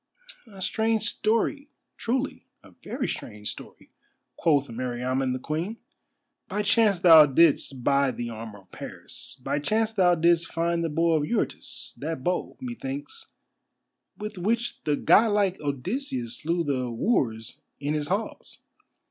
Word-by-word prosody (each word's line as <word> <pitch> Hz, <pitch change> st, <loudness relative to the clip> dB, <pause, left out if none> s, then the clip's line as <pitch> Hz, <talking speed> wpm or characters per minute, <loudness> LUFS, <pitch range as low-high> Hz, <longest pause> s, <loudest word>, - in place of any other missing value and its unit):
"A 190 Hz, -2 st, -8 dB
strange 220 Hz, 0 st, +1 dB
story, 230 Hz, +7 st, 0 dB, 0.3 s
truly—a 255 Hz, +4 st, -4 dB
very -, -, -3 dB
strange 105 Hz, -2 st, -5 dB
story," -, -, -13 dB, 0.4 s
quoth 145 Hz, -4 st, +2 dB
Meriamun 125 Hz, +2 st, -2 dB
the 130 Hz, -, -1 dB
Queen. 160 Hz, -, -3 dB, 0.7 s
"By 210 Hz, -, -2 dB
chance 205 Hz, -1 st, +4 dB
thou 165 Hz, -3 st, +8 dB
didst 140 Hz, -3 st, +3 dB
buy 140 Hz, 0 st, +3 dB
the 120 Hz, -2 st, -4 dB
armour 110 Hz, -2 st, -8 dB
of 95 Hz, -, -30 dB
Paris, 130 Hz, -, -8 dB
by 145 Hz, -, 0 dB
chance 215 Hz, +8 st, +1 dB
thou 185 Hz, -5 st, +4 dB
didst 170 Hz, 0 st, +2 dB
find 170 Hz, 0 st, 0 dB
the 165 Hz, -, 0 dB
bow 165 Hz, +2 st, +2 dB
of 145 Hz, -, 0 dB
Eurytus, 220 Hz, +8 st, -3 dB
that 150 Hz, -2 st, -4 dB
bow, 180 Hz, +3 st, -1 dB
methinks, 275 Hz, -, -6 dB, 0.9 s
with 210 Hz, -2 st, -6 dB
which 230 Hz, +6 st, -1 dB
the 150 Hz, -, +2 dB
god 215 Hz, +7 st, +4 dB
like 200 Hz, -3 st, +1 dB
Odysseus 140 Hz, -, -3 dB
slew 170 Hz, +2 st, -1 dB
the 130 Hz, -4 st, -1 dB
wooers 115 Hz, -, -1 dB, 0.2 s
in 145 Hz, +1 st, -1 dB
his 150 Hz, -1 st, -1 dB
halls. 200 Hz, +6 st, -3 dB
165 Hz, 140 wpm, -26 LUFS, 135-215 Hz, 0.9 s, thou